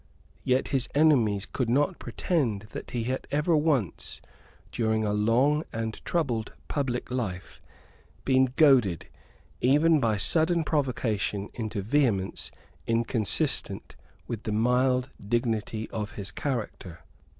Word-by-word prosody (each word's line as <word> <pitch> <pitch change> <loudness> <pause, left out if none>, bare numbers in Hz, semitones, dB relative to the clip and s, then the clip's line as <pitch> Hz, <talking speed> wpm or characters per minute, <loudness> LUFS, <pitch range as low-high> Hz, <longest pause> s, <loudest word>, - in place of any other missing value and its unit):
Yet 130 +1 +1
his 135 -3 0
enemies 120 -10 +3
could 125 -4 -2
not 145 +8 +1
pretend 130 - -1
that - - -7
he 120 -2 -2
had 130 +3 -3
ever 150 +4 +2
once, 150 - 0 0.5
during 110 -1 0
a 105 - 0
long 125 +9 +2
and 110 -1 -4
troubled 125 -10 -1
public 125 -4 -2
life, 100 -8 -4 0.6
been 130 -1 +3
goaded, 125 - +4 0.5
even 150 +5 +4
by 115 -5 +1
sudden 165 - +2
provocation, 110 - -1
into 110 -3 -4
vehemence 110 -6 0 0.4
inconsistent 115 -1 0 0.3
with 115 -3 -5
the 110 - -4
mild 125 +3 +2 0.2
dignity 110 -2 -1
of 105 -2 -4
his 95 -2 -5
character. 110 - -4
120 Hz, 115 wpm, -27 LUFS, 110-140 Hz, 0.6 s, goaded